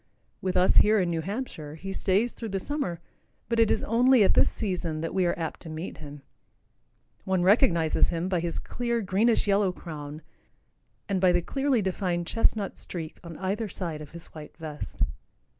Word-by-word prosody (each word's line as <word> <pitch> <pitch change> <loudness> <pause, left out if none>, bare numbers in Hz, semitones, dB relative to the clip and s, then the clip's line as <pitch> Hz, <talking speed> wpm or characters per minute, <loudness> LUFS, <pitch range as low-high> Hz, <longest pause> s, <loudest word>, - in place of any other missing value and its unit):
With 185 -1 0
us 180 +1 +4
here 215 0 +6
in 180 -2 +1
New 165 -1 -1
Hampshire, 180 - -5
he 195 +4 -6
stays 205 +6 +1
through 225 - -6
the 195 -1 -1
summer, 275 - -2 0.5
but 230 -1 0
it 225 -2 +5
is - - +1
only 245 +1 +5
at - - +4
this - - +5
season 175 -6 -3
that 165 - -3
we 185 -2 +2
are 175 - 0
apt 165 -2 -4
to 165 - -9
meet 160 +3 -6
him. 145 -2 -10 1.0
One 190 -2 +1
recognizes 180 - +4
him 170 +1 -1
by 185 -2 +1
his 170 0 -2
clear 235 -1 -2
greenish 215 +4 +2
yellow 200 -2 +3
crown 155 -3 -8 0.8
and 195 -2 0
by 185 -1 +6
the 175 0 +3
clearly 270 -2 +1
defined 180 -2 -1
chestnut 215 +1 +1
streak 165 -3 -7
on 170 -2 -8
either 200 +3 -2
side 165 -5 -3
of 150 - -9
his 170 +1 -6
white 155 -1 -10
vest. 155 -3 -4
185 Hz, 185 wpm, -27 LUFS, 165-210 Hz, 1.0 s, here